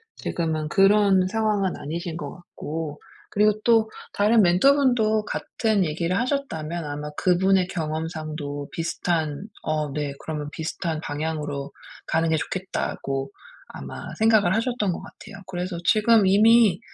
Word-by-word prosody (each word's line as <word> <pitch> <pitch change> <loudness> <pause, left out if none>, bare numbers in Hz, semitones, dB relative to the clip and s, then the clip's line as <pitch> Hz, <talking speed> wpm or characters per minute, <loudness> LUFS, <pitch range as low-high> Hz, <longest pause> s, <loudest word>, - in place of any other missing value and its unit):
지금은 160 -2 -2
그런 195 -1 +4
상황은 205 -2 0
아니신 165 +2 -5
것 - - -6
같고 160 -3 -6 0.3
그리고 210 +1 +4
또 225 -2 +3 0.2
다른 215 +3 +4
멘토 185 +9 +5
분도 225 -6 +2
같은 210 -2 0
얘기를 170 +4 -1
하셨다면 175 - -2
아마 150 +1 -5
그분의 185 +1 +3
경험상도 155 -3 -4
비슷한 165 -1 -2 0.2
어, 155 -2 -2
네. 145 -1 -2
그러면 150 -2 -5
비슷한 160 0 -3
방향으로 145 -2 -4 0.4
가는 165 +1 +1
게 160 - +2
좋겠다고 140 -6 -3 0.4
아마 - - -8
생각을 215 -4 +4
하셨던 230 -4 0
것 170 - -4
같아요. 200 0 -12
그래서 180 -1 -4
지금 215 -1 +4
이미 210 0 +5
175 Hz, 295 characters per minute, -24 LUFS, 155-210 Hz, 0.4 s, 멘토